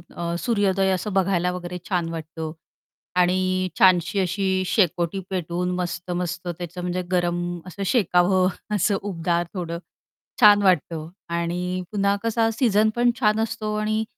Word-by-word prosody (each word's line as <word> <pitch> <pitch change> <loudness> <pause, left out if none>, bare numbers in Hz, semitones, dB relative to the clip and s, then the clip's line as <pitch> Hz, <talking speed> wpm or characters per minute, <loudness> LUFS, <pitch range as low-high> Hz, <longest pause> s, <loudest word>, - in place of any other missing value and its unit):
अ, 170 0 -3
सूर्योदय 195 -5 +1
असं 190 +2 -2
बघायला 185 -2 +2
वगैरे 180 0 -5
छान 175 -3 0
वाटतं 160 -1 -6 0.7
आणि 185 +1 +2
छानशी 185 -1 +4
अशी 190 0 0
शेकोटी 180 -2 +1
पेटवून 180 -1 -2
मस्त-मस्त 180 0 -3
त्याचं 175 +1 -5
म्हणजे 180 +1 -2
गरम 175 -1 +1 0.3
असं 195 +2 -6
शेकावं 185 -3 +3 0.3
असं 200 +1 +2
उबदार 175 -3 -1
थोडं 170 -3 -4 0.6
छान 205 -1 +8
वाटतं 165 -3 +1 0.3
आणि 180 +2 -2
पुन्हा 200 -1 +2
कसा 225 0 +2
सीझन 220 -3 +3
पण 240 0 +3
छान 215 -3 +3
असतो 215 -1 -2
आणि 215 +1 0
185 Hz, 130 wpm, -23 LUFS, 175-200 Hz, 0.7 s, छान